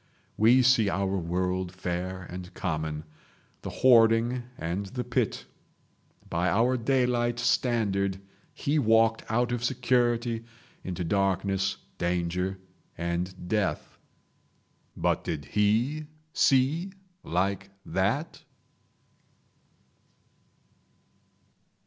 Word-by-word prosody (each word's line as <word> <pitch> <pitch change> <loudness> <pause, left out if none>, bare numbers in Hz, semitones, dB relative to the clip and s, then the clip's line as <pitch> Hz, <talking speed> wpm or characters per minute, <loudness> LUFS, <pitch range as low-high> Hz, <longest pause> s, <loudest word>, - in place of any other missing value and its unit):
We 120 +4 +5
see 120 -5 +4
our 95 0 0
world 90 +1 -1
fair 90 0 -4
and 90 +1 -8
common, 80 -3 -3 0.6
the - - -5
hoarding 120 0 +4 0.2
and 90 +5 -3
the 125 +5 -4
pit. - - -1 0.8
By 85 +2 0
our 115 +8 +3
daylight 120 -1 +1
standard 100 -6 +1 0.3
he 150 +2 0
walked 115 -2 +3
out 120 +2 +1
of 120 -1 -2
security 120 -2 +1 0.4
into 90 -1 -4
darkness, 95 +1 0 0.2
danger 90 +2 -1 0.4
and 85 +2 -3
death. 95 -7 -1 1.0
But - - +1
did 75 -3 -4
he 115 - +1 0.3
see 150 +8 +2 0.3
like 95 +3 -1 0.2
that? 110 - -1
100 Hz, 90 wpm, -28 LUFS, 90-120 Hz, 1.0 s, We